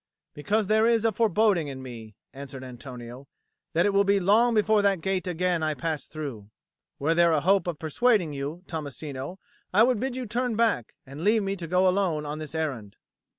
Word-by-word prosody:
"Because 205 +9 0
there 220 +3 +3
is 230 -1 +2
a 225 - +4
foreboding 210 -5 +2
in 135 -2 -7
me," 115 -4 -9 0.2
answered 135 -1 -8
Antonio, 125 0 -9 0.5
"that 170 - +3
it 205 - +2
will 200 0 +4
be 200 0 +3
long 225 +6 +4
before 215 0 +3
that 200 -2 +2
gate 190 +2 -2
again 180 -1 0
I 155 -1 0
pass 160 -1 -3
through. 135 -10 -7 0.5
Were 155 +4 +1
there 170 0 +4
a 155 - +3
hope 185 +2 +3
of 170 -3 -2
persuading 175 - +1
you, 145 +6 -5
Tommasino, 145 0 -6 0.3
I 210 +4 +5
would 245 -2 +2
bid 260 +1 -2
you 255 -1 -4
turn 240 +1 -1
back, 220 - 0
and 140 +4 -8
leave 215 +2 +3
me 195 0 -2
to 175 -3 -6
go 180 +2 +3
alone 180 -5 +1
on 150 +1 -5
this 155 +1 -7
errand." 130 -11 -3
170 Hz, 195 wpm, -26 LUFS, 145-205 Hz, 0.5 s, I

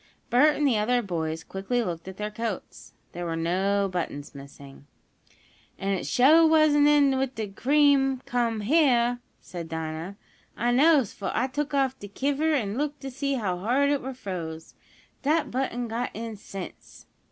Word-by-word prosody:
Bert 290 +5 +5
and 295 - 0
the 230 -6 +2
other 245 +3 +1
boys 160 -4 -3
quickly 195 +8 -2
looked 170 -3 -5
at 190 0 -8
their 210 0 -4
coats. 220 -3 -6 0.2
There 175 0 -5
were 165 - -2
no 190 +4 +1
buttons 170 -6 -4
missing. 140 0 -13 0.9
"An' 195 - -3
it 190 - -3
suah 295 +6 +5
wasn't 310 -2 +5
in 285 -3 +4
when 265 0 0
de 220 -2 -4
cream 270 +3 +3
come 235 -3 -1
heah," 245 -2 +3 0.2
said 170 -2 -8
Dinah. 160 +4 -5 0.4
"I 240 +2 +1
knows, 275 -2 +4
fo 200 - -4
I - - +2
took 290 +2 -3
off 265 -1 +1
de 205 - -8
kiver 285 +9 0
an' 230 -6 -1
looked 290 -1 -3
in 270 - -4
t' - - -18
see 275 0 -1
how 190 -7 -2
hard 260 +8 +2
it 285 - 0
were 265 0 -6
froze. 165 -8 -6 0.5
Dat 305 +3 +1
button 245 -1 -2
got 230 +2 -2
in 225 0 -5
since!" 195 -2 -10
235 Hz, 175 wpm, -26 LUFS, 190-275 Hz, 0.9 s, Bert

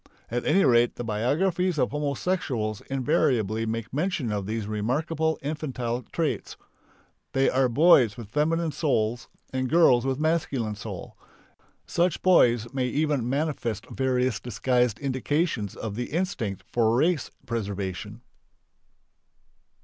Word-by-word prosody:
At 120 +1 -2
any 195 - +4
rate 120 -1 +4
the 120 - -5
biographies 160 - 0
of 125 -3 +1
homosexuals 140 - -2
invariably 125 - +1
make 115 +1 -4
mention 150 - -1
of 100 -2 -2
these 110 -1 -2
remarkable 150 +10 -1
infantile 130 -5 -3
traits. 165 -3 -2 0.8
They 135 0 +3
are 130 -1 +2
boys 125 - +5
with 115 -3 -8
female 160 +3 +1
souls 120 -6 0 0.3
and 130 -1 -1
girls 130 -7 +5
with 135 -1 -1
a - - -5
masculine 140 -9 0
soul. 105 - -8 0.7
Such 175 -1 0
boys 120 - +4
may 130 -2 0
even 145 -3 0
manifest 130 -7 -2
various 130 -3 0
disguised 125 -1 0
indications 135 - -1
of 110 -3 -5
the 120 +4 -3
instinct 145 - -2
for 115 -1 +2
race 160 +2 +1 0.2
preservation. 105 -2 -4
125 Hz, 125 wpm, -26 LUFS, 115-155 Hz, 0.8 s, boys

